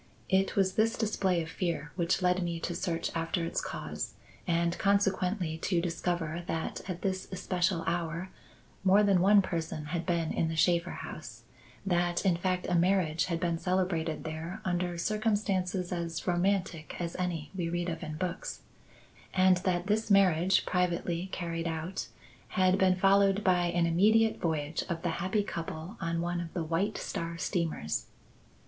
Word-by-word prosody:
It 190 Hz, 0 st, +2 dB
was 190 Hz, -1 st, +2 dB
this 220 Hz, +3 st, +2 dB
display 190 Hz, -5 st, +1 dB
of 160 Hz, -, -8 dB
fear 170 Hz, -4 st, -2 dB
which 175 Hz, +1 st, +1 dB
led 180 Hz, +1 st, +3 dB
me 170 Hz, -1 st, -2 dB
to 175 Hz, -, -2 dB
search 165 Hz, -1 st, -2 dB
after 165 Hz, +1 st, -1 dB
its -, -, -1 dB
cause, -, -, -5 dB, 0.3 s
and 170 Hz, 0 st, +1 dB
consequently 190 Hz, -4 st, +1 dB
to 175 Hz, +1 st, +1 dB
discover 170 Hz, -1 st, -2 dB
that 160 Hz, 0 st, -3 dB
at 180 Hz, -1 st, -4 dB
this 185 Hz, -1 st, -1 dB
especial 180 Hz, -2 st, 0 dB
hour 170 Hz, +2 st, -2 dB, 0.5 s
more 195 Hz, +2 st, +6 dB
than 195 Hz, -3 st, +4 dB
one 200 Hz, +1 st, +6 dB
person 160 Hz, -4 st, -3 dB
had 170 Hz, 0 st, -2 dB
been 170 Hz, -3 st, +1 dB
in 165 Hz, -, +1 dB
the 160 Hz, -, -2 dB
Shaffer 170 Hz, +2 st, +3 dB, 0.2 s
house; -, -, -9 dB, 0.4 s
that, 175 Hz, 0 st, +1 dB
in 185 Hz, -3 st, +4 dB
fact, 180 Hz, +1 st, -1 dB
a -, -, 0 dB
marriage 175 Hz, -2 st, +2 dB
had 170 Hz, -2 st, -2 dB
been 170 Hz, -2 st, 0 dB
celebrated 180 Hz, -4 st, 0 dB
there 165 Hz, +5 st, -5 dB
under 175 Hz, -1 st, -1 dB
circumstances 195 Hz, -3 st, 0 dB
as 170 Hz, -2 st, -3 dB
romantic 180 Hz, -3 st, 0 dB
as 170 Hz, -1 st, -3 dB
any 170 Hz, -5 st, -3 dB
we 170 Hz, -3 st, -1 dB
read 175 Hz, +1 st, -1 dB
of 170 Hz, -, -3 dB
in 155 Hz, -3 st, -5 dB
books, 175 Hz, +1 st, -4 dB, 0.7 s
and 185 Hz, -1 st, +5 dB
that 180 Hz, -1 st, 0 dB
this 215 Hz, +2 st, 0 dB
marriage, 190 Hz, -2 st, +4 dB
privately 175 Hz, 0 st, 0 dB
carried 170 Hz, -1 st, -3 dB
out, 165 Hz, +3 st, -3 dB, 0.4 s
had 185 Hz, +1 st, +2 dB
been 185 Hz, -1 st, +4 dB
followed 195 Hz, +1 st, +4 dB
by 180 Hz, -2 st, +3 dB
an 170 Hz, 0 st, +2 dB
immediate 215 Hz, +7 st, +3 dB
voyage 155 Hz, -2 st, -1 dB
of 165 Hz, -1 st, -3 dB
the 175 Hz, -, +1 dB
happy 195 Hz, +3 st, +1 dB
couple 170 Hz, 0 st, -5 dB
on 165 Hz, 0 st, -1 dB
one 175 Hz, 0 st, -1 dB
of 165 Hz, -1 st, -6 dB
the 170 Hz, -, 0 dB
White 170 Hz, +7 st, 0 dB
Star 170 Hz, 0 st, -4 dB
steamers. 165 Hz, -, -2 dB
175 Hz, 165 wpm, -30 LUFS, 165-190 Hz, 0.7 s, more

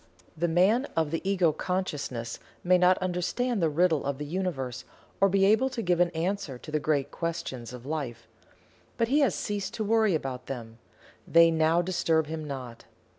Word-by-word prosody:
The 170 Hz, +2 st, 0 dB
man 195 Hz, -, +3 dB
of 160 Hz, -2 st, +1 dB
the 165 Hz, -, -1 dB
Ego 180 Hz, -5 st, +3 dB
Consciousness 150 Hz, -10 st, -3 dB, 0.2 s
may 180 Hz, 0 st, +4 dB
not 180 Hz, +1 st, +5 dB
understand 185 Hz, +6 st, -1 dB
the 165 Hz, -, +3 dB
Riddle 160 Hz, -1 st, +2 dB
of 140 Hz, -1 st, -2 dB
the 150 Hz, -, -5 dB
Universe 145 Hz, -7 st, -3 dB, 0.4 s
or 195 Hz, -, +5 dB
be 195 Hz, 0 st, +3 dB
able 220 Hz, +6 st, +4 dB
to 245 Hz, -3 st, -4 dB
give 175 Hz, -1 st, +1 dB
an 175 Hz, 0 st, +4 dB
answer 175 Hz, -4 st, -2 dB
to 150 Hz, -, -11 dB
the 155 Hz, -, +1 dB
great 145 Hz, -2 st, 0 dB
Questions 160 Hz, -8 st, -4 dB
of 125 Hz, 0 st, -10 dB
Life 135 Hz, -6 st, -4 dB, 0.7 s
but 230 Hz, 0 st, +1 dB
he 285 Hz, +3 st, +3 dB
has 270 Hz, -, +3 dB
ceased 205 Hz, -1 st, -3 dB
to 220 Hz, -, -2 dB
worry 220 Hz, -3 st, +3 dB
about 135 Hz, -4 st, -4 dB
them 115 Hz, -3 st, -7 dB, 0.5 s
they 165 Hz, 0 st, +6 dB
now 160 Hz, +2 st, +3 dB
disturb 170 Hz, -3 st, +1 dB
him 155 Hz, 0 st, -5 dB
not. 130 Hz, -4 st, -7 dB
165 Hz, 180 wpm, -28 LUFS, 145-190 Hz, 0.7 s, they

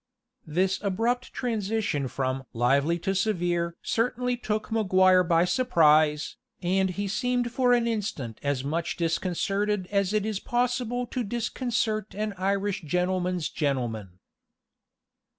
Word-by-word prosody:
This 185 Hz, +5 st, 0 dB
abrupt 230 Hz, +6 st, -1 dB
transition 215 Hz, -, -1 dB
from 130 Hz, +1 st, -2 dB
"lively 140 Hz, +7 st, +2 dB
to 190 Hz, +3 st, -1 dB
severe" 175 Hz, -4 st, 0 dB
certainly 250 Hz, +2 st, 0 dB
took 215 Hz, -3 st, -3 dB
Maguire 185 Hz, -4 st, +4 dB
by 170 Hz, 0 st, +3 dB
surprise, 155 Hz, -, +3 dB, 0.2 s
and 190 Hz, +1 st, +1 dB
he 200 Hz, +3 st, -3 dB
seemed 245 Hz, +3 st, 0 dB
for 250 Hz, 0 st, +2 dB
an 240 Hz, -1 st, +3 dB
instant 200 Hz, -, -3 dB
as 140 Hz, -2 st, -1 dB
much 160 Hz, +4 st, -2 dB
disconcerted 190 Hz, +4 st, 0 dB
as 200 Hz, -2 st, +1 dB
it 215 Hz, -1 st, +1 dB
is 215 Hz, -3 st, -2 dB
possible 245 Hz, 0 st, -1 dB
to 245 Hz, +1 st, -3 dB
disconcert 230 Hz, -1 st, -2 dB
an 210 Hz, 0 st, -2 dB
Irish 195 Hz, +1 st, -1 dB
gentleman's 180 Hz, +1 st, 0 dB
gentleman. 120 Hz, -, -2 dB
195 Hz, 120 wpm, -27 LUFS, 165-225 Hz, 0.2 s, Maguire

